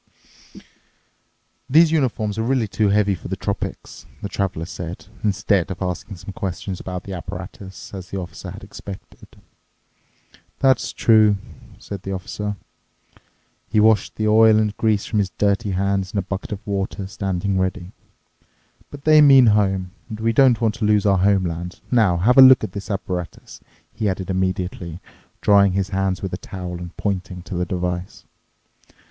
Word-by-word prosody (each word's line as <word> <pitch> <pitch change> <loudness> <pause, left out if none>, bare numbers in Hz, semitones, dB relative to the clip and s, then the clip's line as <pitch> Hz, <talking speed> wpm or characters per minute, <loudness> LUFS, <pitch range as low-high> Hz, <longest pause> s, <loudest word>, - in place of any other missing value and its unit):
"These 160 +4 +6
uniforms 110 -8 0
are - - +1
really 120 -1 +1
too 105 +1 +1
heavy 100 0 +3
for 85 - -7
the - - -3
tropics," - - -5 0.2
the 100 - -3
Traveler 90 -5 -2
said, 90 -2 -7 0.2
instead 100 -3 +1
of 95 - -5
asking 95 +2 -4
some 95 +2 -9
questions 95 0 -4
about 90 -1 -6
the 100 - -7
apparatus, 95 +2 -8
as 95 -2 -8
the 100 - -4
Officer 90 -2 -7
had - - -9
expected. 100 -1 -11 1.3
"That's 130 -1 +2
true," 110 -3 +4 0.4
said 100 -2 -8
the 95 +1 -5
Officer. 105 +2 -4 1.1
He 105 +2 +2
washed 110 -2 +3
the 110 - -1
oil 110 0 +6
and 105 -1 +1
grease 110 -2 +1
from 110 - -1
his 100 -2 0
dirty 100 +1 +1
hands 95 +1 -1
in - - -2
a 100 - 0
bucket 95 +2 -5
of 105 -1 -6
water 100 0 -3
standing 95 -1 -2
ready, 95 0 -2 1.0
"but 145 -1 -11
they 155 -1 +6
mean 135 -3 +8
home, 95 -3 +1 0.2
and 110 - -6
we 115 +1 +1
don't 130 -1 +5
want 115 -3 +1
to 110 - 0
lose 105 -1 +3
our 100 -2 +3
homeland." 90 -3 0
"Now, 110 -8 +3
have 120 +9 +4
a - - +12
look 130 -2 +8
at 105 - -3
this 100 +1 -7
apparatus," 90 -4 -5 0.3
he 110 -2 -1
added 95 0 -3
immediately, 95 -2 -2 0.4
drying 100 -2 +5
his 95 +1 -1
hands 95 -1 -1
with 95 - -4
a - - -2
towel 90 -3 -7
and 90 -1 -9
pointing 95 -3 -3
to 90 - -8
the 90 0 -1
device. 90 0 -4
100 Hz, 165 wpm, -21 LUFS, 95-105 Hz, 1.3 s, a